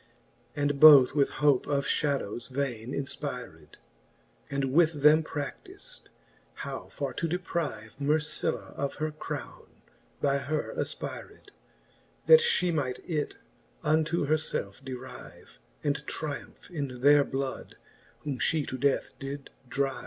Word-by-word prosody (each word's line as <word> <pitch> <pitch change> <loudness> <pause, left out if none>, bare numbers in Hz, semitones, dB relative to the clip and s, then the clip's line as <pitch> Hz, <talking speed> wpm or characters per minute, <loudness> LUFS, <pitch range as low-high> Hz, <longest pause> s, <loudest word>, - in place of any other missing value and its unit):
And 145 -1 0
both 145 -5 +9
with 140 -2 +3 0.2
hope 140 -4 +4
of 140 -1 0
fhadovves 135 -6 -1
vaine 130 -3 -3
infpyred) 140 -1 -5 0.7
And 140 -1 -1
with 160 -2 +3
them 150 +1 +7
pra£iiz'd, 375 - -7 0.5
how - - -6
for - - -4
to 170 - -2
depryvc 160 - -3
Mercilla 150 +2 0
of 140 0 -2
her 155 0 -2
crowne, 155 - -8 0.4
by 140 -1 +2
her 150 +2 -2
afpyred,' 410 - -5 0.7
That 475 - +9
fhe 190 - +2
might 130 -4 -2
it 155 -4 -2 0.5
unto 155 +1 +2
her 155 +2 +3
felfe 115 -8 -3
deryve, 130 -1 -10 0.2
And 145 0 0
tryumph 150 +3 -5
in 140 -7 -4
their 145 +1 +7
blood, 135 -1 -4 0.4
whom 140 -4 -4
fhe 155 -3 +1
to 130 - -5
death 140 +1 +1
did 140 0 -6 0.2
dryve. 135 -2 -1
145 Hz, 125 wpm, -29 LUFS, 135-155 Hz, 0.7 s, both